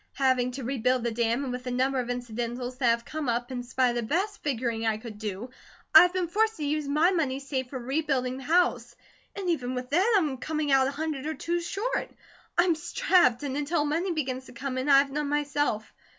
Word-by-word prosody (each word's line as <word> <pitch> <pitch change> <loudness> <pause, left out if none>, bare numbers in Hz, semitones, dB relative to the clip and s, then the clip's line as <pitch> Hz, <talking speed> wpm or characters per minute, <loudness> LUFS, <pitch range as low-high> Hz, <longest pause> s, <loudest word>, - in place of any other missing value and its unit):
Having 255 -2 +2
to 270 +1 -6
rebuild 250 0 0
the 235 - 0
dam, 235 +3 0
and 255 -2 -3
with 250 0 -6
a - - 0
number 260 +2 +1
of 245 -1 -3
incidentals 245 +1 -4
that 255 - +2
have 235 0 +2
come 310 -4 -3
up, 240 +2 -1
in 250 -1 -3
spite 250 +1 +1
of - - -5
the - - 0
best 370 - -1
figuring 235 -5 -2
I 220 -1 +1
could 215 -2 -9
do, 210 +3 -5 0.4
I - - +12
have 360 0 +3
been 370 -2 0
forced 440 +5 +1
to 300 - -3
use 300 0 -1
my 305 +6 +3
money 295 -8 0
saved 265 -2 -3
for 265 - -5
rebuilding 260 -1 -1
the 270 - -8
house; 250 -8 +1 0.4
and 395 -2 -4
even 255 -7 -1
with 250 +1 -5
that, 380 +10 +3
I 380 - +3
am 280 -4 -2
coming 305 +1 -2
out 265 -1 +5
a - - 0
hundred 300 -1 -3
or 315 - -2
two 340 +4 -1
short. 425 +8 -2 0.5
I'm 345 0 +4
strapped; 315 -4 +2
and 275 -2 -3
until 295 +2 0
money 330 +5 0
begins 260 -5 -3
to - - -13
come 260 +1 -4
in 265 +3 -2
I 275 - +8
have 275 0 +3
none 295 0 -2
myself. 290 -6 -1
270 Hz, 235 wpm, -27 LUFS, 245-310 Hz, 0.5 s, I